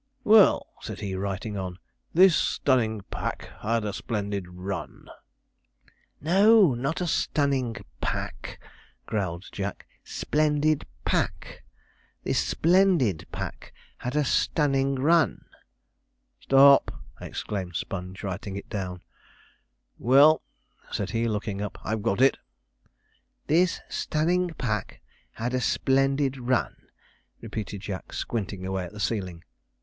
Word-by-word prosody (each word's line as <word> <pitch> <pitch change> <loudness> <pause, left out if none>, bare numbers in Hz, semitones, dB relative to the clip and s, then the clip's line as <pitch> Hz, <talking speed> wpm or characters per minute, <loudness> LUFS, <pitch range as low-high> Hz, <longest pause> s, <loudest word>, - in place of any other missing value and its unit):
'Well,' 215 -2 +6 0.2
said - - -7
he, 100 -2 -3
writing 100 +2 -3
on, 90 -2 -5 0.3
'this 185 0 +6
stunning 115 -7 +1
pack - - -4
had 115 0 0
a 105 - -2
splendid 100 -3 -3
run.' 90 -2 -6 1.1
'No, 195 - +5
not 140 +9 -2
stunning 140 -7 0 0.3
pack,' - - -4 0.5
growled 95 -4 -3
Jack, 100 0 -5 0.2
'splendid 150 0 0 0.2
pack - - -1 0.6
"this - - +1
splendid 170 - +2
pack - - -7 0.2
had 125 +3 -4
a 150 -1 +2
stunning 135 0 +1
run."' 160 +5 +2 0.9
'Stop!' 140 +1 +5 0.2
exclaimed 95 -4 -5
Sponge, 90 +1 -5
writing 95 0 -4
it 100 - -7
down; 90 -4 -4 1.0
'well,' 140 +6 +6 0.5
said 100 - -3
he 115 0 0
looking 105 -2 -2
up, 105 - -5
'I've 110 +1 -2
got 105 +1 0
it.' 135 - +4 1.1
'This 170 +3 +2
stunning 170 +2 0
pack 110 -6 -3 0.3
had 120 +3 -3
a 130 - 0
splendid 135 +1 +1
run,' 125 0 -1 0.5
repeated 105 -2 -6
Jack, 95 -2 -6
squinting 100 -4 -3
away 95 0 -2
at 90 - -9
the 105 - -9
ceiling. 95 -6 -2
115 Hz, 110 wpm, -26 LUFS, 100-145 Hz, 1.1 s, Well